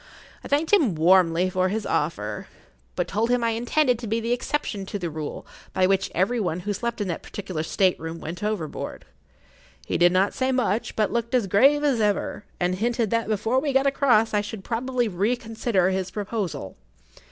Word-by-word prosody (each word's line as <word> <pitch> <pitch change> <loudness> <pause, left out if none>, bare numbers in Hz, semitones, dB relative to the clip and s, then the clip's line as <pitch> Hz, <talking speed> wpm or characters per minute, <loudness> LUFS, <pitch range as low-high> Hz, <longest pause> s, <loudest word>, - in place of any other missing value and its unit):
I - - -7
thanked 300 +6 0
him 275 - +4
warmly 175 +1 +4
for 185 0 +1
his 215 +1 -2
offer, 105 -9 -2 0.5
but - - -1
told 220 +3 0
him 245 -1 +2
I 230 - +2
intended 245 +2 +1
to 235 - -6
be 225 +2 0
the 230 +1 -2
exception 245 -5 -2
to 205 - -3
the 175 -4 -4
rule 155 -1 -6 0.3
by 185 - +3
which 195 0 +1
every 200 +8 +1
one 180 -4 -1
who 205 +3 -2
slept 235 +2 -3
in 205 - -1
that 170 - -3
particular 185 -6 -5
state 185 +3 +1
room 165 +1 -6
went 170 +5 -7
overboard. 210 -8 -4 0.8
He - - -1
did 175 0 +6
not 190 +2 +2
say 260 0 0
much, 240 -4 0
but 215 -1 +1
looked 235 +1 -1
as 245 -5 +2
grave 275 +10 +4
as 270 -6 +2
ever, 205 0 -1
and 180 +1 +1
hinted 230 +2 0
that 230 0 +1
before 220 +4 +1
we 280 0 -1
got 270 +1 +3
across 245 -6 +3
I 210 - +3
should 205 -1 -7
probably 245 +2 -1
reconsider 220 -1 0
his 190 0 -2
proposal. 200 - -4
210 Hz, 195 wpm, -24 LUFS, 185-240 Hz, 0.8 s, did